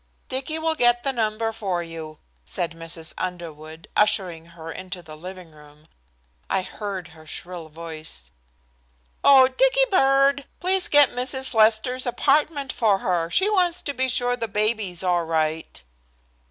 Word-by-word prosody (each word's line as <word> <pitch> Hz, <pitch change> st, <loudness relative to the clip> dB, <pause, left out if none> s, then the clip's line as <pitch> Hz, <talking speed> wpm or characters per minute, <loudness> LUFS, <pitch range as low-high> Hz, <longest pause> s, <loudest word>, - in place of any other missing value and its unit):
"Dicky 270 Hz, +4 st, -1 dB
will 320 Hz, 0 st, 0 dB
get 240 Hz, -5 st, +3 dB
the 275 Hz, -, -1 dB
number 225 Hz, -1 st, -1 dB
for 190 Hz, -6 st, -2 dB
you," 160 Hz, -2 st, -8 dB, 0.3 s
said 170 Hz, -, -3 dB
Mrs. 165 Hz, 0 st, -7 dB
Underwood, 160 Hz, -3 st, -6 dB
ushering 180 Hz, -6 st, +1 dB
her 165 Hz, 0 st, -7 dB
into 180 Hz, +1 st, -7 dB
the 155 Hz, -2 st, -11 dB
living 180 Hz, +1 st, -10 dB
room. 150 Hz, 0 st, -18 dB, 0.6 s
I 190 Hz, -, +1 dB
heard 195 Hz, -3 st, -6 dB
her 155 Hz, -1 st, -16 dB
shrill 175 Hz, 0 st, -7 dB
voice. 155 Hz, -, -9 dB, 0.9 s
"Oh, 265 Hz, -2 st, +8 dB
Dicky -, -, +3 dB
bird, 275 Hz, -4 st, +4 dB
please 370 Hz, +1 st, +1 dB
get 290 Hz, -1 st, +6 dB
Mrs. 260 Hz, +1 st, -2 dB
Lester's 225 Hz, +4 st, +3 dB
apartment 285 Hz, +2 st, +1 dB
for 210 Hz, -4 st, +3 dB
her. 175 Hz, -3 st, -1 dB
She 380 Hz, -, +3 dB
wants 360 Hz, -4 st, +1 dB
to 285 Hz, -, -3 dB
be 260 Hz, -1 st, 0 dB
sure 245 Hz, 0 st, 0 dB
the 230 Hz, -2 st, -3 dB
baby's 210 Hz, -3 st, 0 dB
all 175 Hz, -2 st, +2 dB
right." 160 Hz, -, -2 dB
200 Hz, 145 wpm, -24 LUFS, 165-260 Hz, 0.9 s, Oh